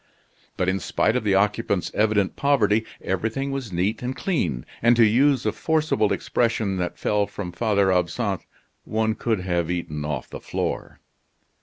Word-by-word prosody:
But 90 - 0
in 95 +1 +1
spite 110 - +1
of 125 - 0
the 100 -2 +2
occupant's 100 -1 +1
evident 105 -2 +2
poverty, 110 -6 +2 0.2
everything 115 +9 -1
was 135 -6 -4
neat 95 +5 0
and 125 +1 -3
clean, 80 - -1 0.2
and 120 +1 +5
to 115 -1 +6
use 130 +4 +3
a - - +2
forcible 155 -10 +1
expression 110 -5 0
that 90 -1 -3
fell 105 -1 +1
from 90 -4 -6
Father 100 0 +2
Absinthe, 90 +2 -1 0.4
one 110 0 0
could 110 -3 -1
have 85 -2 -1
eaten 85 -4 -3
off 75 -4 -3
the - - -8
floor. - - -4
105 Hz, 160 wpm, -24 LUFS, 90-120 Hz, 0.4 s, to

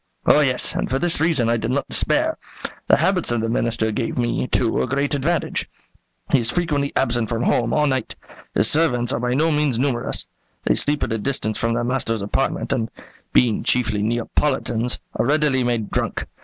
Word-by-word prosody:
"Oh, - - +6
yes; - - +2
and - - -2
for 130 - +1
this 170 +2 0
reason 160 -8 +2
I 115 0 +2
did 110 +1 -3
not 135 +2 -1
despair. - - +1 0.5
The - - +5
habits 180 -1 +1
of 120 -2 0
the 115 - -1
Minister 115 -1 0
gave 110 +2 -3
me, 120 +1 0
too, 115 -3 +1
a - - -1
great 140 +1 -1
advantage. 155 +4 -1 0.6
He 140 - +5
is 115 -1 0
frequently 145 -2 -1
absent 120 -4 0
from 115 0 -1
home 120 -2 +1
all 150 -1 +2
night. 130 -3 -1 0.4
His 110 - +3
servants 125 -6 +2
are - - -1
by 125 +1 -1
no 160 +4 +2
means 150 -5 +1
numerous. 125 -2 0 0.4
They - - +3
sleep 145 0 +1
at - - -1
a 110 - -2
distance 110 -3 -2
from 115 0 0
their 120 - -1
master's 120 -4 -1
apartment, 135 +6 -1
and, 115 -4 -1 0.4
being 120 -4 +3
chiefly 115 -4 +1
Neapolitans, 120 +1 -1 0.2
are 110 - +1
readily 145 -3 +2
made 120 -3 -1
drunk. - - -2
125 Hz, 195 wpm, -21 LUFS, 115-145 Hz, 0.6 s, Oh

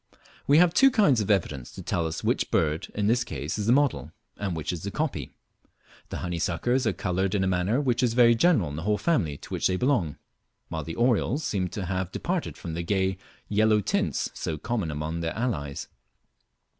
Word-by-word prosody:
We 145 - +6
have 175 0 +5
two 270 +8 +6
kinds 175 - +3
of 105 - -3
evidence 75 - 0
to - - -8
tell 85 -2 -1
us 80 - -5
which - - 0
bird 80 0 +1
in 105 - 0
this 120 +3 +3
case 85 -5 -4
is 105 - -2
the - - +5
model, 120 - +2 0.2
and 100 -4 -3
which 80 - -3
the 90 +3 -4
copy. 150 +7 -3 0.7
The - - -4
honeysuckers 90 +9 0
are 110 - +2
coloured 95 +1 -1
in 95 - +1
a - - +1
manner 95 +7 +1
which 125 -4 +1
is 120 -2 +1
very 120 -1 +6
general 115 - +3
in 70 - -6
the - - -4
whole 105 +4 +1
family 85 - 0
to - - -13
which - - +1
they 95 - 0
belong, 105 - +1 0.5
while 80 -1 -3
the 80 +2 -6
orioles 120 +4 +1
seem 95 - -1
to 95 +1 -5
have 95 0 -2
departed 175 - -3
from 85 -4 -6
the 85 - -2
gay 95 +1 0 0.3
yellow 110 +1 +3
tints 100 - -1
so 80 - -3
common 105 0 -2
among 75 +2 -3
their 80 0 -3
allies. 75 - -3
100 Hz, 205 wpm, -26 LUFS, 85-120 Hz, 0.7 s, We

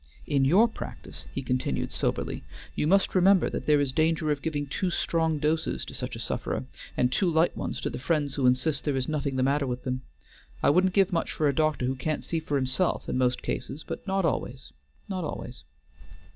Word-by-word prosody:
In 140 -3 +2
your 190 - +6
practice," 225 - -8
he 135 - -4
continued 125 0 -1
soberly, - - -2 0.3
"you 150 - 0
must 195 +4 +3
remember 190 0 +5
that - - -4
there 150 -1 +5
is 140 -2 +1
danger 155 +1 +2
of 145 -1 -1
giving 145 -2 -2
too 180 +6 -1
strong 160 -2 +1
doses 155 +2 0
to - - -9
such - - -4
a - - -7
sufferer, - - -2 0.3
and 125 0 +3
too 185 +6 +2
light 160 +1 +3
ones - - -3
to - - -1
the - - -5
friends 145 +1 0
who 135 -3 +2
insist 135 +4 +2
there 145 -2 0
is 130 -1 -1
nothing 145 -3 -1
the 130 - +2
matter 140 +1 +2
with 125 0 -3
them. 130 0 -2 0.6
I - - +6
wouldn't 185 +4 +3
give 195 -1 +3
much 165 - 0
for 155 - +1
a 140 - +2
doctor 155 -3 +1
who 130 - +1
can't 150 +4 -2
see 165 - -1
for 155 -2 -3
himself 135 +7 0
in - - -2
most 125 0 +1
cases, 150 - -4
but - - -6
not 190 -1 +1
always, 130 - -2 0.3
not 185 -2 -3
always." 70 - -6
150 Hz, 215 wpm, -27 LUFS, 135-165 Hz, 0.6 s, your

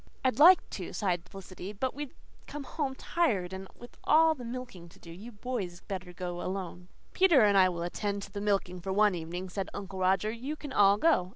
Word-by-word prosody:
"I'd 255 -1 +1
like 350 +5 +8
to," - - -6
sighed 180 -3 -1
Felicity, 195 0 -9
"but 255 +5 -2
we'd 290 -1 -7 0.3
come 295 -1 -6
home 275 -2 -3
tired 210 - 0
and 190 0 -7
with 240 - -14
all 320 +1 +5
the 260 -5 -10
milking 235 -8 -7
to - - -18
do. 170 - -13
You 205 +8 -10
boys 205 -6 -5
better 185 -2 -6
go 175 0 -5
alone." 180 -1 -5 0.3
"Peter 345 -10 +5
and 205 -1 +4
I 185 -1 +6
will 170 -1 -4
attend 200 +3 -3
to - - -10
the 200 - -5
milking 195 -3 -1
for 190 - -4
one 210 +1 +4
evening," 175 +2 -5
said 190 +1 -4
Uncle 190 -1 -6
Roger. 190 +3 +2
"You 255 +7 -5
can 290 -3 -8
all 200 -2 +5
go. 210 - +2
200 Hz, 210 wpm, -30 LUFS, 180-255 Hz, 0.3 s, like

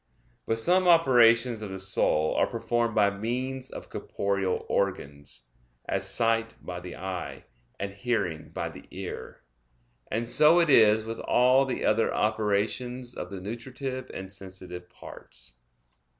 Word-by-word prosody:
But 115 - +1
some 180 +10 +3
operations 120 -8 +5
of 105 - -5
the 95 - -5
soul 95 -5 +2
are - - +2
performed 120 -1 -1
by 100 -2 +4
means 125 +5 -3
of - - -10
corporeal 100 -2 -2
organs; 70 -10 -3 0.4
as - - 0
sight 115 -1 +1
by 90 -1 -6
the 90 0 -8
eye, 95 -1 -5 0.4
and 100 0 -4
hearing 100 -7 -2
by - - -4
the - - -13
ear. - - -7 0.7
And 115 +1 -2
so 155 +7 +5
it 165 -3 +3
is 110 -3 +6
with 115 0 -5
all 130 +2 +4
the 130 - -3
other 110 +1 +2
operations 110 +4 -1
of - - -6
the 100 -2 -6
nutritive 130 +6 -6
and 95 0 -7
sensitive 95 -2 -9
parts. - - -13
110 Hz, 140 wpm, -27 LUFS, 95-125 Hz, 0.7 s, is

